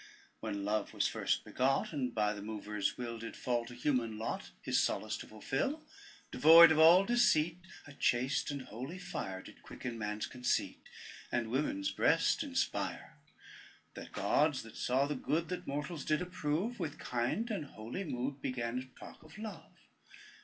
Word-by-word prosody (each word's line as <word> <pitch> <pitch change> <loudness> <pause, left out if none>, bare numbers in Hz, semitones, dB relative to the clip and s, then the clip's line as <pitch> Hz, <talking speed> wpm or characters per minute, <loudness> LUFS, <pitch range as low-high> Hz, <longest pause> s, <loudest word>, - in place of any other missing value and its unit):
When 100 -1 -4
Love 105 0 -1
was - - +2
first - - -1
begot, 135 +5 +1
And 130 -4 -1
by 105 -1 +2
the 105 - -7
mover's 105 -1 -3
will 115 -2 -5
Did 115 0 -7
fall 120 -2 -1
to 120 - -9
human 120 -4 0
lot 110 - -4
His - - +1
solace - - -1
to - - -9
fulfil, 140 - -2 0.5
Devoid 165 +1 +9
of 155 - +3
all 170 +4 +8
deceit, 170 -8 +3 0.3
A 145 - -11
chaste 130 0 +1
and 140 -2 -4
holy 130 - -7
fire 95 - -5
Did - - -14
quicken 120 -2 -7
man's 105 0 -2
conceit, 125 -1 -2 0.4
And 115 -2 -1
women's 110 -8 0
breast - - +3
inspire. - - -2 0.7
The - - -8
gods - - +1
that - - -12
saw 130 +3 +1
the 145 - -2
good 160 +4 -1
That 180 - -5
mortals 145 +3 -3
did 155 - +1
approve, 180 +6 -2
With 160 -4 -3
kind 125 - -1
and 195 -8 -2
holy 120 - -6
mood 135 -3 -3
Began 125 -2 -2
to - - -9
talk - - -11
of 155 +3 -14
Love. 215 0 -8
130 Hz, 165 wpm, -34 LUFS, 115-160 Hz, 0.7 s, Devoid